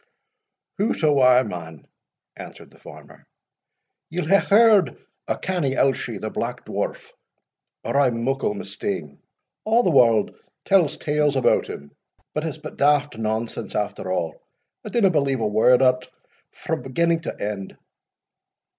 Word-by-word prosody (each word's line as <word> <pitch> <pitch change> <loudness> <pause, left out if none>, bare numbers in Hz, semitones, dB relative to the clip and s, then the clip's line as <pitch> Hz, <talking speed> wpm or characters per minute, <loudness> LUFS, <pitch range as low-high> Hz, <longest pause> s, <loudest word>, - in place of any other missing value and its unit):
] - - -61
"Hout 210 -3 -1
awa, 130 -4 +5
man," 80 - -8 0.5
answered - - -11
the - - -21
farmer, - - -15 0.8
"ye'll 175 0 -3
hae 195 +5 +4
heard 210 -3 +4 0.3
o' - - -1
Canny 170 -8 -2
Elshie 135 0 0
the - - -5
Black - - -4
Dwarf, - - -4 0.7
or - - -3
I 140 - +4
am 115 -1 -2
muckle 135 -4 -1
mistaen 95 -7 -5 0.5
A' 230 +2 +4
the 180 - +2
warld 115 -6 +4 0.3
tells 180 -7 +3
tales 150 -1 0
about 130 - +2
him, 70 0 -9 0.4
but 150 - -2
it's 160 -2 -4
but 155 0 -10
daft 145 0 +2
nonsense 110 +1 -3
after 105 -2 -3
a' 90 -3 -1 0.6
I - - -5
dinna 205 -6 +3
believe 140 -5 0
a 110 - -1
word 120 +5 +4
o't 125 0 +2 0.4
frae - - -4
beginning 165 +5 0
to 165 - -7
end." 100 -2 -5
135 Hz, 145 wpm, -23 LUFS, 110-160 Hz, 0.8 s, awa